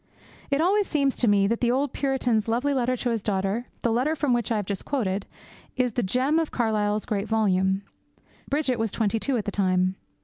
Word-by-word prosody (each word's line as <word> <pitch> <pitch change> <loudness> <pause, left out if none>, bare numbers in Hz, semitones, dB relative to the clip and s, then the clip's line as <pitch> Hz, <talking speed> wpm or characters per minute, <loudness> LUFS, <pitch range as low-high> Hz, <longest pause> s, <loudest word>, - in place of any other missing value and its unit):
It 280 +2 +1
always 395 +4 +2
seems 280 -3 +1
to 245 - +1
me 200 -1 +4
that 230 +3 0
the 240 - +2
old 270 +2 0
Puritan's 250 -6 0
lovely 245 +5 +1
letter 255 -1 0
to 245 0 -1
his 225 -2 -1
daughter, 200 +4 -1 0.2
the 235 - +2
letter 260 +7 +1
from 290 -5 +1
which 240 -1 0
I - - +2
have 210 -2 -1
just 195 -1 -4
quoted, 200 -8 -2 0.5
is 250 -1 +1
the 245 - -1
gem 255 +10 +1
of 325 - -1
Carlyle's 215 -3 0
great 205 0 -2
volume. 195 -3 +1 0.7
Bridget 275 -4 0
was 225 -2 0
twenty 225 0 0
two 270 +2 0
at 210 - -3
the 205 - -2
time. 185 -2 +1
230 Hz, 210 wpm, -25 LUFS, 205-265 Hz, 0.7 s, me